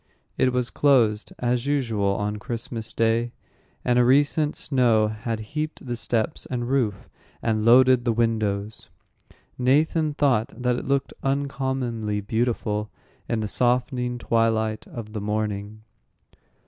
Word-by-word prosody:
It 130 - +2
was 125 -1 -1
closed, 115 -7 +2
as 125 +1 -1
usual 115 -9 0
on 105 +1 -2
Christmas 115 +1 -5
day, 115 +1 +1 0.5
and 125 0 +3
a - - +6
recent 145 +4 +3
snow 120 -6 +2
had 110 +1 -4
heaped 155 -1 -4
the 120 -1 -3
steps 115 +4 -2
and 120 -2 -3
roof, 120 -7 0 0.4
and 110 -2 0
loaded 125 +1 +6
the 120 - +1
windows. 110 -2 -1 0.7
Nathan 150 +4 +2
thought 130 -7 +2
that 125 0 +1
it - - -5
looked 140 0 0
uncommonly 130 -6 -1
beautiful 110 -1 -1 0.4
in 115 -2 0
the 105 - -2
softening 125 +2 0
twilight 110 -2 0
of 110 -3 -8
the 105 - -4
morning. 105 0 -3
120 Hz, 130 wpm, -24 LUFS, 110-130 Hz, 0.7 s, a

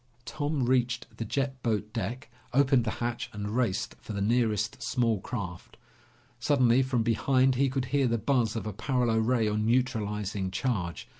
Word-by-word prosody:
Tom 145 +3 -2
reached 125 -1 +1
the - - -2
jet 135 +3 -2
boat 105 -2 -1
deck, 115 +4 -4 0.2
opened 135 -3 +4
the - - 0 0.2
hatch, 120 -1 -3
and 105 +1 -4
raced 120 -7 0
for - - -7
the 100 - -3
nearest 110 0 +1
small 120 -4 +1
craft. 95 -8 -6 0.6
Suddenly 130 -1 +4
from 130 -3 +1
behind 130 +3 +3
he 135 +2 +2
could 130 -1 -1
hear 140 -2 +3
the 115 0 +1
buzz 120 -1 +1
of 115 - -3
a 105 - -4
paralo 120 +1 +1
ray 115 0 +2
on 105 0 0
neutralizing 105 -5 0
charge. 95 -4 -2
120 Hz, 165 wpm, -28 LUFS, 105-130 Hz, 0.6 s, opened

